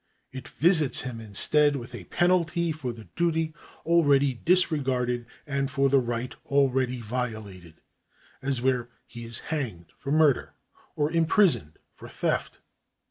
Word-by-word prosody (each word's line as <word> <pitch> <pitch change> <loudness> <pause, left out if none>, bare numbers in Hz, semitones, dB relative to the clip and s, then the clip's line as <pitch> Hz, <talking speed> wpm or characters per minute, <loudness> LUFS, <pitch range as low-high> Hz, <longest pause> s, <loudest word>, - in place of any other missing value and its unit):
It 130 -1 -8
visits 160 -3 +3
him, 125 -2 -6
instead, 145 +8 +2
with 125 -2 -7
a 120 - -8
penalty 175 -1 +1
for 150 -5 -4
the 115 -1 -11
duty 165 -2 0 0.3
already 145 -5 +4
dis 180 +8 +2
regarded 125 -5 -1 0.2
and 140 -2 -1
for 140 -2 +1
the 135 0 +4
right 120 0 -3
already 130 -2 +1
violated; 110 -8 -5 0.7
as 135 -3 -2
where 125 -2 +1 0.2
he 120 0 -10
is 115 -1 -3 0.2
hanged 110 - -4
for 140 - -6
murder, 150 -4 +2 0.4
or 150 0 0
imprisoned 165 - +2 0.2
for - - -12
theft. - - -2
135 Hz, 135 wpm, -26 LUFS, 120-155 Hz, 0.7 s, already